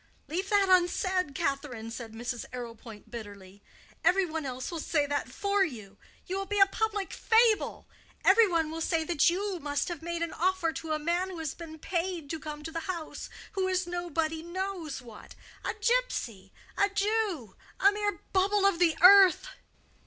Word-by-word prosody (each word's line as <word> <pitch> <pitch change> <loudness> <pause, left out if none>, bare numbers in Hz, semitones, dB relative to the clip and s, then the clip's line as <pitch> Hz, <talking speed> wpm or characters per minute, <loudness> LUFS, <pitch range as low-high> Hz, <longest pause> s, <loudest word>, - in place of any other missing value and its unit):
"Leave 365 +7 -3
that 405 -1 +4
unsaid, 365 -3 +2
Catherine," 270 -6 -3
said 230 -1 -7
Mrs. 240 +1 -4
Arrowpoint, 230 -3 -9
bitterly. 205 -4 -9 0.4
"Every 385 +1 +4
one 320 -3 -4
else 255 +3 -5
will 335 - -4
say 295 -1 +1
that 285 -2 -2
for 400 +6 +1
you. 215 - -6 0.3
You 375 +1 -3
will 390 - -4
be 410 0 -1
a 390 - +9
public 415 0 -2
fable. 450 -1 +2 0.4
Every 430 +3 +7
one 330 -4 0
will 325 0 -5
say 325 0 +1
that 320 -2 +3
you 380 +1 -2
must 290 0 -2
have 345 -4 -5
made 340 0 -3
an 335 - -4
offer 360 -1 +1
to 320 -1 -4
a - - +1
man 345 +4 -1
who 370 - -7
has 320 -3 -3
been 320 -2 -10
paid 340 -2 -3
to 320 - -3
come 300 0 -7
to 325 - -6
the 330 - -3
house—who 370 +3 -5
is 370 -1 0
nobody 330 -2 -2
knows 345 -5 -4
what—a 230 -3 -9
gypsy, 435 - -1 0.3
a 400 - +3
Jew, 400 - -1 0.2
a 395 - +6
mere 410 0 -2
bubble 395 +1 +3
of 395 -4 +3
the 335 -3 +3
earth." 390 +4 +8
340 Hz, 175 wpm, -29 LUFS, 285-385 Hz, 0.4 s, a